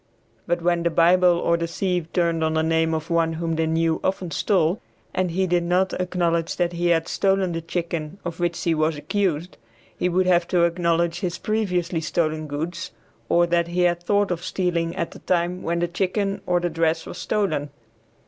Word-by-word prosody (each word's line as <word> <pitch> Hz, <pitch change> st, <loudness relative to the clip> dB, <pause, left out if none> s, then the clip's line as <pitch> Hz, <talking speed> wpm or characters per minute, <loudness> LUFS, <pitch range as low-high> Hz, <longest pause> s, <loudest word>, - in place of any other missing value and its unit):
But 175 Hz, 0 st, 0 dB
when 175 Hz, 0 st, +2 dB
the 170 Hz, -, +1 dB
Bible 175 Hz, +1 st, +4 dB
or 170 Hz, 0 st, +2 dB
the 170 Hz, 0 st, -2 dB
sieve 175 Hz, -1 st, -2 dB
turned 170 Hz, -2 st, +1 dB
on 160 Hz, 0 st, 0 dB
the 160 Hz, -, +2 dB
name 160 Hz, 0 st, +2 dB
of 160 Hz, +1 st, -5 dB
one 165 Hz, -1 st, +2 dB
whom 165 Hz, 0 st, -2 dB
they 160 Hz, 0 st, 0 dB
knew 160 Hz, 0 st, +1 dB
often 185 Hz, -2 st, -1 dB
stole, 180 Hz, +2 st, +1 dB, 0.3 s
and 185 Hz, -1 st, 0 dB
he 190 Hz, +3 st, 0 dB
did 175 Hz, -1 st, +2 dB
not 180 Hz, +2 st, +1 dB
acknowledge 175 Hz, -2 st, 0 dB
that 175 Hz, -1 st, 0 dB
he 175 Hz, 0 st, 0 dB
had 165 Hz, -1 st, +2 dB
stolen 195 Hz, -2 st, +1 dB
the 165 Hz, 0 st, -3 dB
chicken 165 Hz, 0 st, -4 dB
of 170 Hz, -1 st, -5 dB
which 175 Hz, -1 st, -1 dB
he 170 Hz, -, +2 dB
was 155 Hz, 0 st, +1 dB
accused, 180 Hz, -1 st, -1 dB, 0.4 s
he 180 Hz, -, 0 dB
would 185 Hz, +1 st, +2 dB
have 175 Hz, -1 st, +3 dB
to 175 Hz, -2 st, +2 dB
acknowledge 170 Hz, 0 st, +1 dB
his 180 Hz, -1 st, -2 dB
previously 180 Hz, -5 st, -1 dB
stolen 155 Hz, -1 st, -1 dB
goods 165 Hz, +5 st, -4 dB, 0.4 s
or 175 Hz, 0 st, +4 dB
that 170 Hz, 0 st, +1 dB
he 175 Hz, +1 st, -1 dB
had 175 Hz, -1 st, +2 dB
thought 200 Hz, +2 st, +1 dB
of 175 Hz, -1 st, -3 dB
stealing 175 Hz, -2 st, -1 dB
at 170 Hz, -, -2 dB
the -, -, -11 dB
time 180 Hz, 0 st, 0 dB
when 170 Hz, +1 st, -1 dB
the 175 Hz, 0 st, +1 dB
chicken 195 Hz, +3 st, -1 dB
or 180 Hz, 0 st, +3 dB
the 175 Hz, -, -1 dB
dress 165 Hz, 0 st, 0 dB
was 175 Hz, -, -8 dB
stolen. 190 Hz, -9 st, -1 dB
170 Hz, 200 wpm, -23 LUFS, 165-180 Hz, 0.4 s, Bible